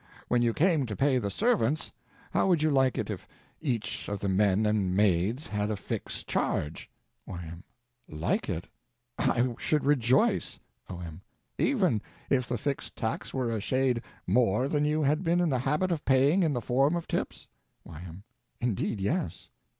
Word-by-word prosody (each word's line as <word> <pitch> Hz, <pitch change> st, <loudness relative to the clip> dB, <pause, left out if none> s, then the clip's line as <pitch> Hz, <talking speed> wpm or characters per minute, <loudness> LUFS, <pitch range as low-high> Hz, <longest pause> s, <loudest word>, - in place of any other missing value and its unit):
When 120 Hz, -, +3 dB
you 120 Hz, -1 st, +3 dB
came 155 Hz, -1 st, +2 dB
to 105 Hz, -, -4 dB
pay 135 Hz, +1 st, +3 dB
the 100 Hz, -4 st, -2 dB
servants, 200 Hz, -, +1 dB, 0.4 s
how -, -, +2 dB
would 170 Hz, -5 st, +3 dB
you 155 Hz, -, +3 dB
like 130 Hz, -2 st, +3 dB
it -, -, -2 dB
if -, -, -7 dB, 0.3 s
each 125 Hz, -8 st, -2 dB
of 100 Hz, -1 st, -3 dB
the 100 Hz, -, -2 dB
men 100 Hz, +2 st, +3 dB
and 100 Hz, -3 st, +1 dB
maids 105 Hz, -, +2 dB
had 105 Hz, 0 st, -2 dB
a 110 Hz, -, 0 dB
fixed 100 Hz, -, -5 dB
charge? 75 Hz, +3 st, -2 dB, 0.4 s
Y.M. 85 Hz, -1 st, -7 dB, 0.5 s
Like 75 Hz, +2 st, -1 dB
it? 85 Hz, -, -3 dB, 0.5 s
I 120 Hz, 0 st, +2 dB
should 150 Hz, -2 st, +1 dB
rejoice! 130 Hz, -3 st, +2 dB, 0.3 s
O.M. 85 Hz, -2 st, -7 dB, 0.4 s
Even 185 Hz, -, +2 dB, 0.3 s
if 125 Hz, -2 st, +2 dB
the 120 Hz, -, 0 dB
fixed 140 Hz, +5 st, -3 dB
tax 110 Hz, -1 st, -3 dB
were 125 Hz, -3 st, -1 dB
a 110 Hz, -2 st, -1 dB
shade 130 Hz, +1 st, +1 dB, 0.2 s
more 115 Hz, +4 st, +2 dB
than 150 Hz, 0 st, +1 dB
you 155 Hz, +1 st, +1 dB
had 150 Hz, +5 st, +2 dB
been 170 Hz, 0 st, +2 dB
in 175 Hz, -2 st, +2 dB
the 130 Hz, -3 st, +1 dB
habit 150 Hz, +8 st, 0 dB
of 160 Hz, -3 st, -1 dB
paying 140 Hz, +7 st, +4 dB
in 160 Hz, -4 st, +2 dB
the 120 Hz, -, -1 dB
form 135 Hz, +7 st, +2 dB
of 170 Hz, -, -3 dB
tips? -, -, -3 dB, 0.4 s
Y.M. 85 Hz, +3 st, -10 dB, 0.4 s
Indeed, 115 Hz, -2 st, -1 dB
yes! 150 Hz, -, -2 dB
125 Hz, 170 wpm, -29 LUFS, 100-150 Hz, 0.5 s, paying